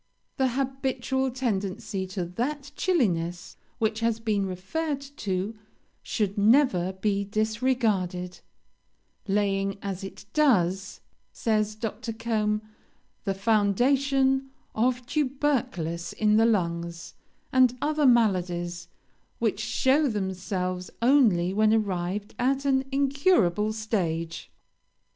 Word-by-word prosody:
The 265 -1 +3
habitual 265 0 -1
tendency 200 -5 -2
to 185 -1 -3
that 275 - -3
chilliness 175 - 0 0.2
which 220 0 0
has 230 -1 0
been 210 -4 0
referred 275 - -3
to 215 -7 -4 0.5
should 205 -2 -2
never 205 -5 +4
be 200 +1 0
disregarded, 215 -4 -1 0.9
'laying, 195 -1 0
as 195 -1 -4
it 195 - -9
does,' 195 - +2 0.3
says 215 -2 0
Dr. 225 +1 -4
Combe, 215 -2 -1 0.6
'the 195 -1 0
foundation 265 +7 +2 0.2
of 250 +2 0
tubercles 255 - -1
in 215 0 +3
the 225 +1 +5
lungs, 170 -5 -1 0.4
and 255 -1 +4
other 300 0 +2
maladies, 175 -7 +1 0.5
which 220 -3 0
show 265 +7 +2
themselves 185 -3 -3
only 220 -10 +4
when 215 +1 +3
arrived 200 -2 -1
at 270 +3 +1
an 265 -1 +2
incurable 270 - +2
stage.' 175 -7 -3
215 Hz, 100 wpm, -27 LUFS, 190-260 Hz, 0.9 s, the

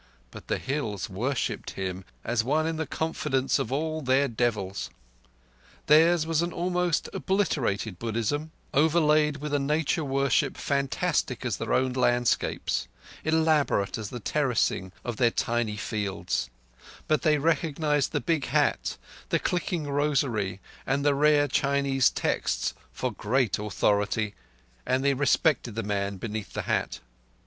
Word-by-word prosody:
But - - -11
the - - 0
Hills 115 -10 -3
worshipped 125 +8 -2
him 95 -1 -4 0.2
as 115 -1 0
one 150 +6 +1
in 160 0 -1
the 160 -2 -2
confidence 145 -4 0
of 110 - -2
all 155 +3 -1
their 135 +1 +3
devils. 110 -5 -1 1.0
Theirs 160 +2 +5
was 165 -1 +1
an 170 0 -1
almost 180 -1 0
obliterated 120 - -1
Buddhism, 115 +7 -1 0.2
overlaid 150 -1 +3
with 150 +1 -5
a 145 - +3
nature 150 +3 0
worship 140 0 +1
fantastic 140 -1 -1
as - - -1
their - - -4
own 130 -1 +2
landscapes, 120 -1 +1 0.4
elaborate 155 -10 +2
as 105 -2 -5
the 125 - -6
terracing 120 -7 0
of 120 -3 -3
their 120 -2 +4
tiny 115 -2 -1
fields; 105 - -2 0.6
but 155 - +2
they 155 -2 +3
recognized 150 -1 +1
the - - 0
big 160 -5 0
hat, - - +1 0.3
the - - +3
clicking 175 -3 -1
rosary, 135 -10 0 0.2
and 140 +2 0
the 145 - +5
rare 145 +1 +4
Chinese 140 -1 +2
texts - - -1 0.2
for - - -2
great 120 -1 0
authority; 105 0 0 0.5
and 130 +2 0
they 140 - +4
respected 140 -3 +2
the 115 - -2
man 100 -1 -2
beneath 105 -1 -5
the - - -3
hat. - - -1
140 Hz, 140 wpm, -27 LUFS, 115-150 Hz, 1.0 s, Theirs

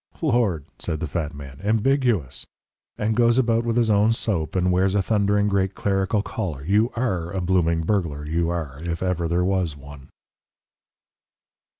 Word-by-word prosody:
"Lord!" 115 - +1
said 80 - -3
the 85 - -2
fat 80 -1 -3
man, 70 -2 -10
"ambiguous! 110 - +1 0.5
And 110 +1 0
goes 120 0 +4
about 115 -2 +2
with 115 0 -1
his 115 -2 +3
own 105 +2 +4
soap, 95 -9 -2
and 90 0 +2
wears 95 +2 +2
a 100 - +3
thundering 105 0 +2
great 95 -1 0
clerical 100 +1 0
collar. 90 -9 -4
You 105 +6 +2
ARE 95 -9 -1
a 95 - -3
blooming 85 -2 +1
burglar, 80 -5 -1
you 85 +2 0
are 80 -6 -4
if 85 +1 -3
ever 90 -2 0
there 85 +2 +1
was 90 -6 0
one!" 70 -1 -12
95 Hz, 165 wpm, -23 LUFS, 80-110 Hz, 0.5 s, goes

